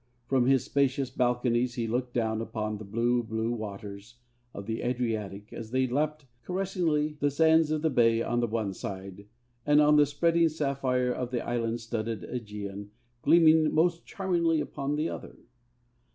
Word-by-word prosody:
From 130 -1 +2
his 135 -2 +4
spacious 135 -2 0
balconies 125 -1 +1
he 120 - -1
looked 125 +2 -2
down 110 -2 0
upon 110 -2 -4
the - - -7
blue, 120 +4 +1
blue 110 0 -2
waters 105 0 -7 0.4
of 100 - -8
the 110 +1 -3
Adriatic 110 -5 -3
as 110 -1 -7
they 130 +2 +1
lapped 150 +3 -1 0.2
caressingly 170 -5 -1
the 145 - +2
sands 160 +2 +4
of 155 0 -1
the 160 - +3
bay 115 -3 +4
on 120 +1 0
the 120 - +1
one 110 -3 -2
side, 95 +1 -7 0.4
and 145 +2 +4
on 150 0 +5
the 145 -1 +5
spreading 165 +3 +2
sapphire 135 -4 0
of 125 -1 -4
the 125 -1 -3
island 115 -1 -1
studded 115 -3 -4
Aegean 105 -3 -6 0.3
gleaming 160 -1 +5
most 170 +1 +2
charmingly 170 -4 0
upon 145 -1 -3
the 155 +2 0
other. - - -7
125 Hz, 165 wpm, -28 LUFS, 110-150 Hz, 0.4 s, on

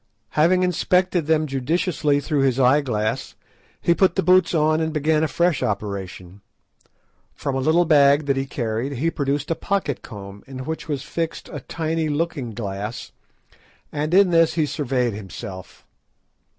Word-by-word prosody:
Having 180 +4 +3
inspected 180 -1 +1
them 155 -1 +2
judiciously 145 +2 0
through 145 +1 -1
his 135 -1 +2
eye 130 +3 +5
glass, 110 -5 -2 0.4
he 170 - +3
put 190 +2 +2
the 190 - +1
boots 185 -1 +4
on 155 0 +2
and 160 0 -1
began 155 0 +1
a - - +2
fresh 170 0 +1
operation. 100 -2 -4 0.9
From 140 - -3
a - - 0
little 160 +6 +3
bag 145 -2 +5
that 140 -1 +1
he 135 0 -2
carried 120 +2 -3
he 155 +6 0
produced 145 +1 -2
a - - +2
pocket 190 -10 -2
comb 100 -1 -10
in 130 -1 -7
which 160 +2 -5
was 145 -4 -3
fixed 165 -1 -4
a 145 - -6
tiny 160 +3 -2
looking 145 -7 -2
glass, 105 0 -5 0.8
and 150 +1 -2
in 195 -2 +5
this 165 -1 +4
he 160 -2 +2
surveyed 130 -6 -1
himself. 95 -2 -9
145 Hz, 160 wpm, -22 LUFS, 125-165 Hz, 0.9 s, eye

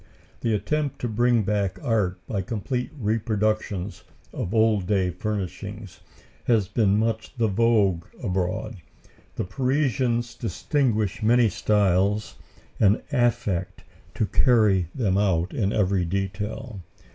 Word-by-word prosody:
The 115 -2 +1
attempt 145 +7 -1
to 125 - -1
bring 120 0 +2
back 100 -2 -1
art 105 -6 +1
by 100 0 -2
complete 120 +6 -3
reproductions 105 -4 -1 0.3
of 90 - -3
old 110 -4 +2
day 95 -3 +1
furnishings 100 0 -5 0.5
has 110 -6 +2
been 100 -1 +2
much 110 +3 -2
the 115 -2 +2
vogue 100 -5 +2 0.2
abroad. 90 -1 -2 0.6
The - - -2
Parisians 125 0 0
distinguish 110 - -1
many 115 +1 +4
styles 100 0 +1 0.5
and 105 0 +3
affect 110 - 0 0.3
to 110 - +1
carry 105 -7 +3
them 100 -7 +1
out 90 -3 +1
in 100 -3 0
every 95 -3 +1
detail. 100 +4 -4
105 Hz, 115 wpm, -25 LUFS, 95-115 Hz, 0.6 s, many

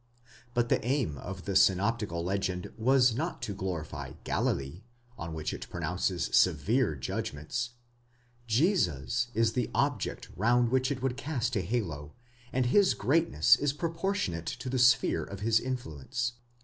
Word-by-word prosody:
But 120 0 +1
the - - +2
aim 125 - 0
of 95 0 -7
the 100 - -2
synoptical 95 -1 +2
legend 95 -1 -2
was 125 +1 +4
not 160 +9 -3
to 100 - -3
glorify 80 -8 -5
Galilee, 70 +7 -1 0.3
on 85 -5 -6
which 80 -1 -3
it - - -7
pronounces 85 +1 -1
severe 95 - +3
judgments 75 - -4 0.7
;—Jesus 110 - +1
is 115 0 +2
the 125 -1 -1
object - - -1
round 120 +4 +3
which 130 +2 +1
it 130 -2 -3
would 130 -1 0
cast 130 -5 -2
a 100 - +1
halo, 85 -8 -3 0.4
and 130 -1 +1
his 195 +10 +4
greatness 130 - +4
is 145 -1 0
proportionate 165 - -2
to 130 - -4
the 130 - 0
sphere 125 +1 +4
of 100 0 -8
his 110 +1 +3
influence. 120 - -3
110 Hz, 145 wpm, -30 LUFS, 85-125 Hz, 0.7 s, was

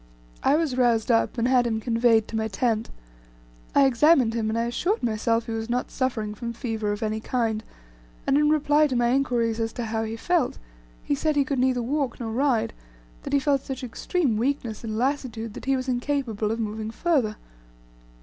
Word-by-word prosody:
I 280 - +3
was 310 -5 0
roused 235 -2 +3
up, 230 +2 +2
and 235 +1 +1
had 250 -2 +3
him 220 -1 -1
conveyed 230 -1 +3
to - - -6
my 220 0 0
tent. 220 +1 -1 0.9
I 280 - +6
examined 265 -2 +4
him, 225 -2 -1
and 220 - -1
I 230 - +1
assured 350 - -1
myself 230 0 0
he - - -5
was 225 0 -3
not 245 +1 -1
suffering 225 -6 -2
from 235 +2 -5
fever 225 -3 -2
of 205 +2 -3
any 215 0 -1
kind; 225 -2 -1 0.6
and 275 - +2
in 295 +1 +4
reply 300 0 +3
to 260 - -2
my 240 0 +2
inquiries 240 -4 +1
as 225 0 -1
to 240 - -4
how 220 0 -2
he 220 0 -4
felt, 335 +4 0 0.5
he - - -1
said 305 +2 0
he 285 -1 +3
could 270 -1 -1
neither 255 -1 +2
walk 270 0 -1
nor 225 -2 -4
ride, 250 -1 +1 0.5
that - - -6
he - - +6
felt 275 -1 +1
such 265 -1 -6
extreme 250 +1 -1
weakness 240 -2 -2
and 220 -1 -3
lassitude 235 -4 -2
that - - -9
he 270 0 +2
was 255 0 -4
incapable 245 -4 -1
of 225 +1 -2
moving 215 0 -3
further. 240 -4 0
240 Hz, 200 wpm, -25 LUFS, 225-270 Hz, 0.9 s, I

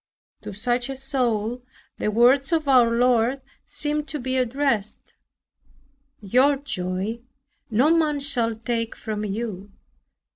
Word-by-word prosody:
To - - -7
such 240 +5 -1
a 270 - -4
soul 250 -4 -1 0.4
the - - 0
words 250 +6 +4
of 320 -3 +1
our 250 -4 +5
Lord 245 +2 +2 0.3
seem 300 0 -2
to 300 - -5
be 260 +1 -3
addressed, 255 -4 -1 1.1
"Your 255 +8 +3
joy 200 -5 -3 0.5
no 265 +9 +3
man 305 -3 +1
shall 240 -5 0
take 230 0 -3
from 215 -1 -5
you." 205 -2 -5
245 Hz, 120 wpm, -24 LUFS, 220-275 Hz, 1.1 s, our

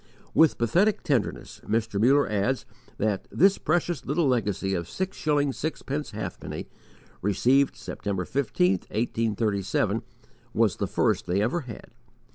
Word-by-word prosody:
With 160 -2 +5
pathetic 180 - +2
tenderness 130 -7 -1
Mr. 110 -2 -1
Muller 140 +5 +5
adds 105 +5 0 0.3
that 105 -2 -1
this 195 +3 +4
precious 170 -2 0
little 150 +3 +1
legacy 105 -6 0
of 85 -2 -3
six 190 0 -3
shillings 145 -3 0
sixpence 150 -1 -3
halfpenny, 110 +1 -6 0.5
received 125 +8 +3
September 95 -3 -4
15, 115 -9 +1 0.2
1837, 110 -3 0 0.5
was - - +3
the - - -1
first - - +1
they 90 +3 +1
ever 120 +11 +1
had. 125 -8 -10
120 Hz, 125 wpm, -26 LUFS, 105-145 Hz, 0.5 s, With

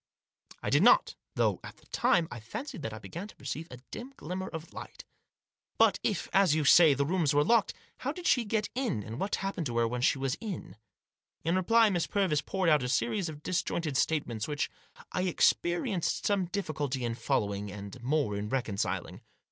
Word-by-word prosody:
I - - -1
did - - +5
not, - - +5 0.2
though, - - +2
at - - -9
the - - -23
same - - -29
time, 170 -2 +3
I 120 - -6
fancied 155 - -7
that 110 - -4
I 110 - -7
began 170 - -7
to - - -15
perceive 150 +4 -5
a 125 - -9
dim 255 +4 -7
glimmer 185 +4 -4
of 160 0 -8
light - - -9 0.4
" - - -55
But - - +4
if, - - -1
as 190 -6 +5
you 155 -2 +1
say, 155 -1 +7
the 140 +1 +1
rooms 160 -3 +1
were 145 - +5
locked, 230 +5 +3 0.2
how 270 - -2
did 345 +3 -9
she 245 - +4
get 215 -1 -1
in, 240 - -1
and 115 +3 -7
what 200 +2 0
happened 195 -5 -3
to 120 -1 -3
her 115 -1 +3
when 120 +1 -3
she 135 - +3
was 135 -1 -1
in? 190 - -6 0.3
" - - -53
In 165 +2 +2
reply 220 +4 +4
Miss 175 -3 0
Purvis 185 -8 +1
poured 190 0 0
out 150 -3 +5
a 125 - -2
series 160 - 0
of 150 -1 -9
dis 180 -1 +1
jointed 160 -5 -3
statements 130 -7 0
which 150 -1 -2 0.4
I 180 - -1
experienced 175 0 +1
some 200 -3 +2
difficulty 150 -8 -2
in 115 - -1
following, 100 -3 -1
and 100 +4 -8
more 135 -4 0
in 105 +1 -3
reconciling. 115 -6 -2
155 Hz, 210 wpm, -30 LUFS, 125-190 Hz, 0.4 s, say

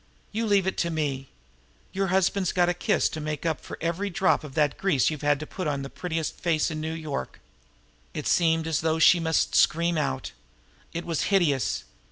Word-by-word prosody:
You 225 +1 -1
leave 200 -3 +3
it 190 - -1
to 170 - +1
me! 140 -5 -2 0.6
Your 195 0 0
husband's 190 0 +1
got 175 -1 +2
a - - +2
kiss 175 - +1
to 155 - -6
make 150 +1 -4
up 160 -2 -1
for - - -8
every 170 +5 -2
drop 185 -2 +2
of 145 -3 -10
that 150 -2 +1
grease 160 - +2
you've 155 - -5
had 145 -1 +2
to - - -4
put 185 +2 -5
on 140 -2 -1
the 135 - -7
prettiest 165 -3 -3
face 165 -2 +1
in 155 0 -4
New 160 +1 -3
York." 155 -4 -5 0.8
It - - -4
seemed 165 -2 +2
as 160 -2 0
though 160 0 +1
she 170 +2 +6
must 160 -1 +1
scream 170 0 +3
out. 135 - -2 0.6
It 170 - -5
was 165 -3 -1
hideous. 160 - +2
160 Hz, 205 wpm, -26 LUFS, 150-175 Hz, 0.8 s, she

